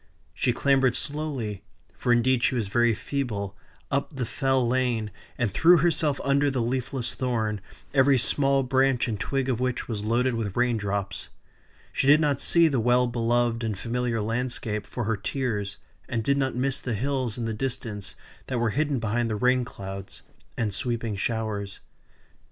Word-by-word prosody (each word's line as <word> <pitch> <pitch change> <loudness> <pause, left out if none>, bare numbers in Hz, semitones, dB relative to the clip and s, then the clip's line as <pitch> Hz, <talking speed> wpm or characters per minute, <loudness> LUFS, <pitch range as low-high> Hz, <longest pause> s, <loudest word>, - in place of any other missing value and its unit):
She 125 - +1
clambered 135 0 +3
slowly 140 -10 -2 0.3
(for 120 - -1
indeed 120 +1 +3
she 130 - +2
was 110 -5 -1
very 120 +1 +3
feeble) 105 -8 -3 0.4
up 140 +2 -1
the 130 -2 -2
Fell 130 -1 +1
Lane, 120 -4 0 0.3
and 115 -6 0
threw 175 +7 +6
herself 155 -3 +1
under 140 +1 +3
the 135 -2 -1
leafless 120 0 -1
thorn, 110 -5 -1 0.3
every 135 0 +5
small 135 +2 +2
branch 130 -1 +2
and 110 -4 -3
twig 135 +2 -1
of 125 -3 0
which 125 -1 -1
was 105 -3 -3
loaded 120 +4 +1
with 110 -3 -3
rain 125 -1 +3
drops. 100 -2 -3 0.6
She 135 - 0
did 145 +2 +7
not 145 -3 +1
see 170 -1 +5
the 135 -5 +1
well 125 +2 +3
beloved 120 0 +1
and 110 -3 -2
familiar 120 +1 -1
landscape 115 -2 -2
for 120 - -4
her 110 +1 0
tears, 105 -3 -2 0.3
and 115 -2 -1
did 140 +5 +2
not 135 -2 0
miss 135 +2 0
the 120 -3 -2
hills 130 -1 -1
in 120 - -3
the 115 - -2
distance 105 -5 -4 0.3
that 130 - -2
were 115 -2 +1
hidden 145 +2 0
behind 115 +1 0
the 110 - -1
rain 125 +3 +3
clouds, 95 -4 -8 0.3
and 105 -3 -1
sweeping 115 -3 -2
showers. 105 -2 -3
120 Hz, 170 wpm, -26 LUFS, 110-135 Hz, 0.6 s, did